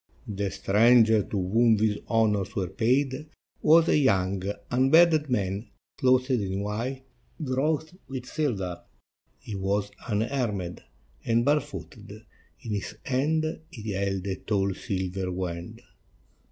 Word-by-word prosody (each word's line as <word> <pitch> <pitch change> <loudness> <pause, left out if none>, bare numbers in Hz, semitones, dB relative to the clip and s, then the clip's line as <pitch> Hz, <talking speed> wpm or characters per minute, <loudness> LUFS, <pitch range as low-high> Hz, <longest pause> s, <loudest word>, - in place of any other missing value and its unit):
The 100 -1 -2
stranger 110 +3 +4
to 95 -2 -3
whom 115 +1 +4
these 105 -1 +1
honors 110 -2 +1
were 95 -5 -1
paid 130 +7 0 0.3
was 165 +1 +6
a - - +4
young, 95 -7 +2 0.3
unbearded 150 +4 +4
man, 100 -2 -1 0.3
clothed 130 +1 +3
in 100 -5 0
white 120 +6 -3 0.4
wrought 150 +3 -1
with 130 -2 -6
silver: 100 - -2 0.6
he 110 - -9
was 100 +1 -1 0.2
unarmed 105 -5 -2 0.4
and 115 +1 +2
barefooted; 100 - -3 0.4
in 110 - -4
his 100 -2 -4
hand 150 +5 +1 0.2
he 110 -8 -6
held 95 -1 -2
a 95 -1 -2
tall 100 -1 0
silver 95 0 -3
wand. 90 -1 -5
110 Hz, 120 wpm, -27 LUFS, 95-130 Hz, 0.6 s, was